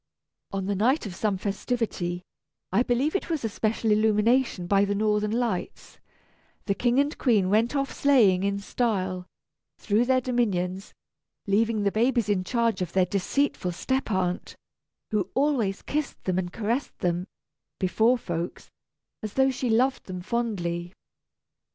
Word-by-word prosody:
On 195 Hz, -1 st, -2 dB
the 200 Hz, -, 0 dB
night 240 Hz, +9 st, +2 dB
of 200 Hz, -, -5 dB
some 200 Hz, +2 st, -1 dB
festivity 195 Hz, -3 st, -2 dB, 0.5 s
(I 195 Hz, +6 st, +3 dB
believe 255 Hz, +7 st, +1 dB
it 390 Hz, -, -1 dB
was 315 Hz, -8 st, -1 dB
a -, -, 0 dB
special 220 Hz, +1 st, 0 dB
illumination 215 Hz, 0 st, +2 dB
by 200 Hz, +2 st, +3 dB
the 200 Hz, 0 st, 0 dB
Northern 210 Hz, 0 st, +1 dB
Lights), 235 Hz, -, -3 dB, 0.7 s
the 200 Hz, -, +1 dB
King 240 Hz, +5 st, +1 dB
and 285 Hz, +2 st, +1 dB
Queen 210 Hz, -8 st, +3 dB
went 230 Hz, +6 st, +2 dB
off 275 Hz, -1 st, -1 dB
sleighing 225 Hz, -10 st, +4 dB
in 200 Hz, 0 st, 0 dB
style, 190 Hz, -4 st, -2 dB, 0.5 s
through 220 Hz, +3 st, +1 dB
their 260 Hz, +1 st, +3 dB
dominions, 200 Hz, -7 st, -1 dB, 0.5 s
leaving 215 Hz, +1 st, +1 dB
the 200 Hz, -, +2 dB
babies 235 Hz, 0 st, +1 dB
in 195 Hz, -3 st, +1 dB
charge 230 Hz, 0 st, 0 dB
of 175 Hz, -2 st, -3 dB
their 185 Hz, -1 st, +4 dB
deceitful 195 Hz, 0 st, -1 dB
step 260 Hz, +9 st, -1 dB
aunt, 185 Hz, -3 st, -1 dB, 0.6 s
who 200 Hz, -3 st, 0 dB
always 260 Hz, -9 st, +1 dB
kissed 300 Hz, -1 st, -3 dB
them 185 Hz, -1 st, 0 dB
and 175 Hz, -1 st, -3 dB
caressed 230 Hz, +7 st, -2 dB
them, 175 Hz, +1 st, -1 dB, 0.5 s
before 225 Hz, +7 st, +3 dB
folks, 175 Hz, -5 st, -5 dB, 0.5 s
as 215 Hz, -2 st, -5 dB
though 265 Hz, 0 st, +3 dB
she 255 Hz, -1 st, -2 dB
loved 255 Hz, +4 st, +2 dB
them 185 Hz, -1 st, -5 dB
fondly. 175 Hz, -6 st, -2 dB
215 Hz, 150 wpm, -26 LUFS, 185-245 Hz, 0.7 s, sleighing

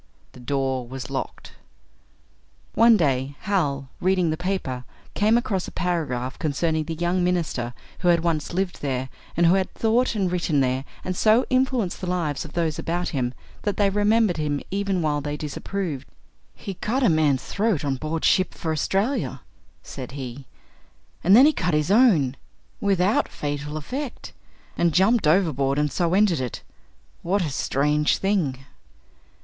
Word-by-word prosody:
The -, -, -14 dB
door 130 Hz, -1 st, -1 dB
was 130 Hz, +1 st, -7 dB
locked. -, -, -5 dB, 1.2 s
One 230 Hz, +1 st, +6 dB
day, 135 Hz, -4 st, 0 dB
Hal, 145 Hz, -10 st, -1 dB
reading 180 Hz, -2 st, +2 dB
the -, -, 0 dB
paper, 175 Hz, -8 st, -3 dB, 0.3 s
came 215 Hz, +3 st, +3 dB
across 195 Hz, -6 st, -1 dB
a -, -, -8 dB
paragraph 140 Hz, -8 st, -2 dB
concerning 160 Hz, 0 st, 0 dB
the 165 Hz, +1 st, -4 dB
young 175 Hz, +2 st, 0 dB
minister 160 Hz, -9 st, -1 dB, 0.2 s
who 180 Hz, -, -1 dB
had 170 Hz, -1 st, +4 dB
once 165 Hz, -3 st, -1 dB
lived 185 Hz, 0 st, -2 dB
there, 130 Hz, -2 st, -2 dB, 0.3 s
and 170 Hz, -, +4 dB
who 170 Hz, -, +6 dB
had 190 Hz, -1 st, +1 dB
thought 230 Hz, +2 st, +2 dB
and 190 Hz, -4 st, 0 dB
written 170 Hz, -5 st, +1 dB
there 130 Hz, 0 st, 0 dB, 0.2 s
and 185 Hz, -, -3 dB
so 220 Hz, +6 st, +4 dB
influenced 255 Hz, -7 st, +1 dB
the 185 Hz, -, -4 dB
lives 165 Hz, -6 st, -1 dB
of 160 Hz, -, -11 dB
those 165 Hz, -3 st, -1 dB
about 175 Hz, +2 st, -2 dB
him 125 Hz, -3 st, -2 dB, 0.3 s
that 205 Hz, -2 st, -2 dB
they 200 Hz, -1 st, +3 dB
remembered 210 Hz, -1 st, +2 dB
him 150 Hz, -2 st, -1 dB
even 195 Hz, -2 st, 0 dB
while 150 Hz, -1 st, 0 dB
they 145 Hz, +1 st, -4 dB
disapproved. 150 Hz, 0 st, -4 dB, 0.5 s
"He 195 Hz, -, -6 dB
cut 245 Hz, +8 st, -1 dB
a -, -, +5 dB
man's 155 Hz, -5 st, +2 dB
throat 200 Hz, -8 st, 0 dB
on 135 Hz, -2 st, 0 dB
board 155 Hz, +3 st, -2 dB
ship 185 Hz, -1 st, +3 dB
for 160 Hz, -, -3 dB
Australia," 195 Hz, -, -1 dB, 0.4 s
said 130 Hz, -1 st, -8 dB
he, 130 Hz, -1 st, -7 dB, 0.8 s
"and 190 Hz, +4 st, +6 dB
then 255 Hz, +4 st, +8 dB
he 310 Hz, -, +5 dB
cut 175 Hz, -, 0 dB
his 150 Hz, +4 st, +1 dB
own, 185 Hz, -, +4 dB, 0.4 s
without 195 Hz, +1 st, +2 dB
fatal 150 Hz, +1 st, -4 dB
effect 255 Hz, -, -6 dB, 0.4 s
and 170 Hz, -2 st, +1 dB
jumped 195 Hz, 0 st, +4 dB
overboard, 150 Hz, -5 st, +2 dB
and 150 Hz, -1 st, +1 dB
so 170 Hz, +4 st, +1 dB
ended 195 Hz, -8 st, +3 dB
it. 125 Hz, -3 st, -5 dB, 0.6 s
What 190 Hz, +3 st, 0 dB
a 155 Hz, -, -2 dB
strange 150 Hz, +3 st, +1 dB
thing!" 155 Hz, -10 st, -1 dB
170 Hz, 160 wpm, -24 LUFS, 145-195 Hz, 1.2 s, then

